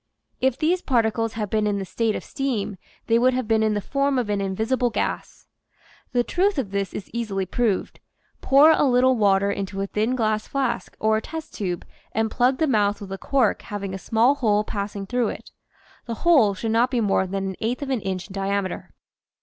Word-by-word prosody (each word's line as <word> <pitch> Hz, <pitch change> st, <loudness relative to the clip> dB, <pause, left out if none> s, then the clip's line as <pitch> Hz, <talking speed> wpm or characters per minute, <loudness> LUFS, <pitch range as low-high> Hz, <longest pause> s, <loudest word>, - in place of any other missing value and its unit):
If 260 Hz, -1 st, +1 dB
these 340 Hz, +4 st, +1 dB
particles 225 Hz, -4 st, +1 dB
had 210 Hz, -3 st, -4 dB
been 215 Hz, -1 st, +1 dB
in 205 Hz, -1 st, 0 dB
the 195 Hz, -, -3 dB
state 225 Hz, +3 st, -1 dB
of -, -, -5 dB
steam 245 Hz, -8 st, -3 dB, 0.3 s
they 230 Hz, 0 st, +3 dB
would 255 Hz, +1 st, +3 dB
have 255 Hz, -3 st, -2 dB
been 220 Hz, 0 st, +3 dB
in 215 Hz, -1 st, +2 dB
the 205 Hz, -, -1 dB
form 275 Hz, +4 st, 0 dB
of 235 Hz, -4 st, -1 dB
an 200 Hz, -1 st, 0 dB
invisible 220 Hz, +6 st, 0 dB
gas. 230 Hz, -, -3 dB, 0.7 s
The 245 Hz, -1 st, +2 dB
truth 380 Hz, +7 st, +1 dB
of 230 Hz, -8 st, -2 dB
this 200 Hz, -1 st, -2 dB
is 195 Hz, -, -7 dB
easily 210 Hz, -5 st, -2 dB
proved. 215 Hz, 0 st, -1 dB, 0.4 s
Pour 285 Hz, +4 st, +6 dB
a 315 Hz, -, +3 dB
little 255 Hz, -1 st, +4 dB
water 200 Hz, -2 st, +3 dB
into 195 Hz, -1 st, -4 dB
a 195 Hz, -, 0 dB
thin 215 Hz, +5 st, -1 dB
glass 215 Hz, -3 st, 0 dB
flask 265 Hz, -4 st, -2 dB
or 220 Hz, 0 st, +2 dB
a -, -, -2 dB
test 320 Hz, +6 st, -7 dB
tube 180 Hz, -4 st, -3 dB, 0.3 s
and 220 Hz, 0 st, 0 dB
plug 255 Hz, +2 st, +2 dB
the 320 Hz, -, +2 dB
mouth 210 Hz, -7 st, +1 dB
with 200 Hz, -2 st, -9 dB
a 195 Hz, -, -5 dB
cork 260 Hz, -6 st, +1 dB
having 200 Hz, -2 st, -5 dB
a 190 Hz, -, -5 dB
small 230 Hz, +7 st, +3 dB
hole 215 Hz, -7 st, +1 dB
passing 200 Hz, -1 st, -4 dB
through 245 Hz, +3 st, 0 dB
it. -, -, -7 dB, 0.6 s
The 230 Hz, -, -3 dB
hole 260 Hz, -13 st, +5 dB
should 225 Hz, +3 st, -3 dB
not 235 Hz, +3 st, +3 dB
be 250 Hz, -2 st, 0 dB
more 195 Hz, -3 st, +1 dB
than 195 Hz, +1 st, -2 dB
an 190 Hz, -, -6 dB
eighth 245 Hz, +5 st, -2 dB
of 270 Hz, -, -4 dB
an 250 Hz, -5 st, 0 dB
inch 190 Hz, -1 st, -4 dB
in 195 Hz, -, -12 dB
diam 195 Hz, 0 st, -1 dB
eter. 185 Hz, -, -6 dB
220 Hz, 215 wpm, -23 LUFS, 200-255 Hz, 0.7 s, Pour